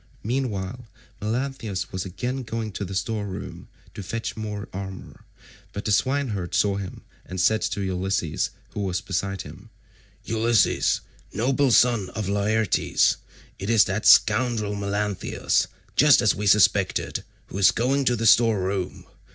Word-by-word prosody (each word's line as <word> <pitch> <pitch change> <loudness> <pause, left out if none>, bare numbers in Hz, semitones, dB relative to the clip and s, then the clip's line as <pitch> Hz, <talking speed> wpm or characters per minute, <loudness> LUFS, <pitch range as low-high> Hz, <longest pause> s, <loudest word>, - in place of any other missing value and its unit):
Meanwhile 115 -2 -3 0.3
Melanthius 115 -3 -3
was 95 0 -4
again 125 +9 -4
going 115 -2 -4
to 100 - -5
the 95 0 -5
store 105 +1 -2
room 95 - -7 0.3
to - - -7
fetch 115 +4 -4
more 105 -2 -5
armour, 95 0 -8 0.5
but 100 - -6
the 105 - 0
swineherd 120 -7 0
saw 100 -1 +2
him 95 -2 -7 0.2
and 95 +1 -5
said 110 +4 +3
to 110 -2 -2
Ulysses 95 -3 -1 0.2
who - - -6
was 95 -3 -1
beside 95 0 -3
him, - - -12 0.6
"Ulysses, 115 -1 +2 0.3
noble 135 +5 +1
son 120 -5 +3
of 110 -3 -3
Laertes, 105 +2 +2 0.4
it 95 - -4
is 115 -2 +6
that - - -1
scoundrel 110 -1 +4
Melanthius, 100 0 -1 0.3
just 145 -3 +6
as 110 - +4
we 105 +1 -3
suspected, 100 -1 +3 0.3
who 95 - -5
is 95 - +7
going 135 +4 +1
to 125 - +3
the 115 0 -2
store 115 -2 +5
room. 95 0 -3
105 Hz, 145 wpm, -24 LUFS, 95-115 Hz, 0.6 s, is